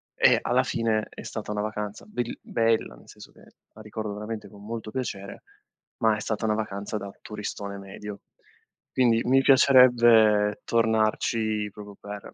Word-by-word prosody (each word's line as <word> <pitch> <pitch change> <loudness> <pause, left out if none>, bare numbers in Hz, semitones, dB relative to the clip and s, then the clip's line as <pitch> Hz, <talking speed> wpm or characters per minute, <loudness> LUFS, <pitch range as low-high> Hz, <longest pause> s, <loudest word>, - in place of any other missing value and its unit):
e - - +5
alla - - +2
fine 110 -2 -1
è - - -10
stata 110 -1 -6
una 105 0 -2
vacanza 105 -1 -5
belli 120 - -4
bella, 115 - 0
nel - - -19
senso - - -13
che - - -20 0.3
la 110 - -13
ricordo 110 -1 -5
veramente 105 +1 -6
con 100 -1 -15
molto 110 0 -6
piacere, 105 -6 -5 0.6
ma 110 -1 +4
è - - -5
stata 110 0 -2
una 110 - +2
vacanza 105 -1 -4
da 100 -1 -6
turistone 105 -1 -6
medio. 100 +1 -9 0.8
Quindi, 120 -3 +4
mi 135 +2 +4
piacerebbe 120 -6 +5
tornarci 110 -1 +1
proprio 105 0 -11
per 105 0 -8
110 Hz, 155 wpm, -26 LUFS, 105-115 Hz, 0.8 s, e